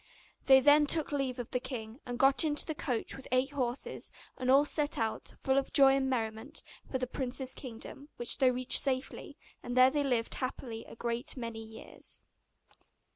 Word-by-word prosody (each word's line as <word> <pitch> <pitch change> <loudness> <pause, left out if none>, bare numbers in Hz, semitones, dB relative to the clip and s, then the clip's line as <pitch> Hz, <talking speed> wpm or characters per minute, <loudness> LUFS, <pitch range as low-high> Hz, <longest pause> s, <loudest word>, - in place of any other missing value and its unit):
They 265 -1 +7
then 295 +1 +5
took 315 0 +4
leave 275 -3 -2
of 245 -2 -6
the 250 - 0
king, 235 -2 -7
and 245 0 -4
got 270 +3 +5
into 300 -2 +1
the 315 - -3
coach 250 -6 -2
with 270 - -11
eight 255 +2 +1
horses, 255 -3 -3 0.2
and 255 - -3
all 275 +3 +6
set 295 0 +1
out, 225 -1 -3
full 265 0 +1
of 275 - -6
joy 270 -2 +6
and 265 -1 0
merriment, 225 +3 -3 0.3
for 260 - 0
the 255 - -2
prince's 260 +1 -3
kingdom, 260 +3 -10
which 240 - -1
they 260 -2 +5
reached 255 0 +3
safely; 260 -1 -2 0.2
and 245 +1 -5
there 255 +1 +7
they 290 0 0
lived 245 -4 0
happily 245 -3 -5
a - - -12
great 235 +2 -3
many 230 -2 -6
years. 220 0 -9
260 Hz, 185 wpm, -31 LUFS, 240-275 Hz, 0.3 s, They